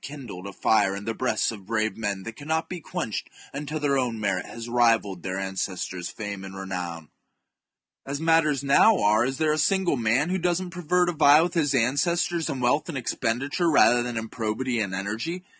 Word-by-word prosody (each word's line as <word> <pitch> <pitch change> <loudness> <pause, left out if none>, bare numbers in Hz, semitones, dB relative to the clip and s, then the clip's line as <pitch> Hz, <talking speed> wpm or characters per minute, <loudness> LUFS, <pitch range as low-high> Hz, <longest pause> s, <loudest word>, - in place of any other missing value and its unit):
12$ - - -34
kindled 120 -10 -8
a - - -6
fire 100 0 +2
in 100 +1 -7
the 115 - -2
breasts - - 0
of 100 -4 -11
brave 110 -1 0
men 100 -3 -3
that 115 +1 -7
cannot 160 +4 -1
chap. - - -20
IV. - - -2
be 175 - -8
quenched 110 -8 -4 0.2
until 150 +2 -4
their 140 -2 +1
own 120 -3 -2
merit 100 -3 -1
has 115 0 -8
rivalled 115 -6 +2
their 95 +1 -4
ancestors' 95 -2 -3
fame 100 -2 -6
and 95 0 -9
renown. 90 -4 -5 0.9
As 140 +1 -4
matters 160 -4 +2
now 170 +10 +5
arc, 110 +3 +3
is 135 0 -3
there 155 0 +2
a 155 - -1
single 190 -1 +2
man 120 +7 +1
who 190 +1 0
does 175 0 +1
not 185 -1 -6
prefer 180 0 +1
to 175 - 0
vie 150 0 +6
with 175 - -2
his 145 -5 +1
ancestors 160 +7 +1
in 130 - -3
wealth 140 +6 +1
and 150 - -4
expenditure 135 +7 -1
rather 120 -5 +5
than 120 -1 -3
in 115 0 -3
probity 115 +2 -2
and 100 -3 -2
energy 115 - -4
120 Hz, 210 wpm, -25 LUFS, 105-155 Hz, 0.9 s, vie